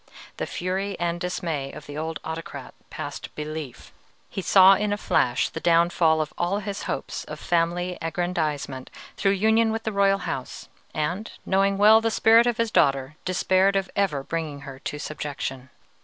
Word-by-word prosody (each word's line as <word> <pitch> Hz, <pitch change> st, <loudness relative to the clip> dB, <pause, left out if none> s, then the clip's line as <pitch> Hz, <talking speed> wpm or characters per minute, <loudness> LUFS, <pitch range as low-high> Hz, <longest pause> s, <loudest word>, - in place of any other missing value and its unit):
The -, -, -3 dB
fury 190 Hz, +2 st, -3 dB
and 170 Hz, 0 st, -1 dB
dismay 165 Hz, -6 st, -3 dB
of 150 Hz, -, -10 dB
the 145 Hz, -, -9 dB
old 160 Hz, +1 st, -3 dB
autocrat 160 Hz, +1 st, -7 dB, 0.2 s
passed -, -, -7 dB
belief; 150 Hz, -3 st, -7 dB, 0.4 s
he 195 Hz, -, -3 dB
saw 190 Hz, +1 st, +7 dB
in 205 Hz, +2 st, 0 dB
a 205 Hz, -, 0 dB
flash 125 Hz, -10 st, +1 dB
the -, -, -6 dB
downfall 165 Hz, -1 st, +3 dB
of 150 Hz, -, -4 dB
all 175 Hz, +3 st, +1 dB
his 200 Hz, -1 st, -5 dB
hopes -, -, -3 dB
of -, -, -8 dB
family 175 Hz, +1 st, 0 dB
aggrandizement 155 Hz, -6 st, -2 dB, 0.3 s
through 195 Hz, -, +2 dB
union 220 Hz, +3 st, +3 dB
with 225 Hz, 0 st, -3 dB
the 220 Hz, -, -2 dB
royal 200 Hz, -1 st, +3 dB
house, 135 Hz, -8 st, -6 dB, 0.2 s
and, 175 Hz, +8 st, -2 dB
knowing 195 Hz, +1 st, +2 dB
well 215 Hz, +2 st, +7 dB
the 225 Hz, -, +1 dB
spirit 225 Hz, +1 st, +5 dB
of 240 Hz, -2 st, +1 dB
his 230 Hz, -1 st, 0 dB
daughter, 135 Hz, +1 st, +2 dB
despaired 185 Hz, +2 st, +2 dB
of 195 Hz, -1 st, -1 dB
ever 175 Hz, -9 st, 0 dB
bringing 155 Hz, -2 st, -4 dB
her 135 Hz, -1 st, -9 dB
to 150 Hz, -, -5 dB
subjection. 140 Hz, -3 st, -5 dB
175 Hz, 170 wpm, -25 LUFS, 150-195 Hz, 0.4 s, saw